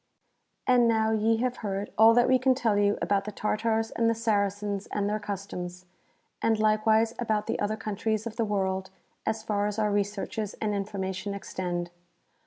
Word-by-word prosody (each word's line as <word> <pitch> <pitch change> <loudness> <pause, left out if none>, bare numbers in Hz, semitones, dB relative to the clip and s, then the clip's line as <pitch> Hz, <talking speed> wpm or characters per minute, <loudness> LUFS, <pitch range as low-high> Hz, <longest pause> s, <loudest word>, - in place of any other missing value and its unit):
* - - -49 0.2
And 245 -2 +5
now 220 -1 +2
ye 220 +1 +2
have 250 -1 -1
heard 200 -1 -3
all 225 +1 +7
that 240 0 +5
we 255 0 +4
can 260 +1 +3
tell 230 -5 +1
you 205 0 +2
about 200 -1 +1
the 210 - -4
Tartars 220 +2 0
and 230 0 +1
the 230 - +1
Saracens 205 -2 -1
and 205 -1 -1
their 210 +1 -1
customs, 185 -3 -6 0.6
and 225 -1 +2
likewise 220 +1 +3
about 215 -3 0
the - - -2
other 210 +1 -1
countries 215 0 -2
of 230 -1 -5
the 235 - 0
world 190 -3 -1 0.4
as 220 0 -1
far 205 -1 0
as 210 0 -3
our 210 -1 +1
researches 205 +1 -2
and 215 -1 -2
information 195 -1 -3
extend. 175 -3 -4
210 Hz, 185 wpm, -28 LUFS, 200-225 Hz, 0.6 s, all